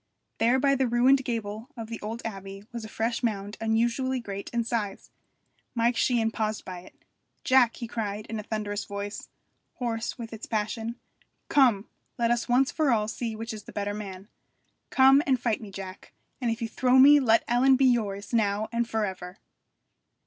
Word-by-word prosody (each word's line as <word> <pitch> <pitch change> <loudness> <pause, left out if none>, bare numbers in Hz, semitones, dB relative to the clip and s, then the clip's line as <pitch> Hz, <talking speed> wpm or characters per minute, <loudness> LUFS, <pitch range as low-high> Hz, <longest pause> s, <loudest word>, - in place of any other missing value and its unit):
There 240 +3 +4
by 275 +1 +3
the 265 -1 +1
ruined 255 +3 +4
gable 225 0 -4
of 225 -1 -6
the 230 0 -7
old 225 +3 -5
abbey 195 -2 -7
was 235 -1 -6
a 220 - -8
fresh 230 +2 -2
mound 205 -3 -2
unusually 235 +4 +1
great 200 -4 -6
in 235 -1 -1
size. 220 -4 -3 0.6
Mike 235 +1 +2
Sheehan 230 -2 +2
paused 215 -1 -2
by 180 -1 -6
it. 180 - -16 0.5
'Jack!' 255 -3 +4
he 235 - -6
cried 210 -2 -4
in 220 0 -5
a - - -3
thunderous 210 -1 -3
voice, 200 0 -6 0.5
hoarse 230 -2 -3
with 230 -2 -7
its 225 - -8
passion. 225 +1 -2 0.5
'Come! 245 -7 +4 0.3
let 235 -1 +2
us 240 0 0
once 255 +2 +3
for 310 -3 +1
all 215 -3 +2
see 225 0 -4
which 225 +1 -5
is 215 -1 -9
the - - -10
better 205 0 -2
man. 195 -2 -7 0.6
Come 270 +1 +6
and 260 -2 +3
fight 230 -2 -1
me, 215 - -8
Jack, 190 -1 -9 0.3
and 240 - 0
if 230 +1 -2
you - - -1
throw 250 +3 +2
me 285 +3 +8
let 230 -4 +4
Ellen 255 +3 +4
be 265 +1 +3
yours 210 -4 0
now 215 -1 +1
and 235 0 -1
for 220 -2 0
ever!' 185 -1 -7
225 Hz, 185 wpm, -27 LUFS, 210-245 Hz, 0.6 s, me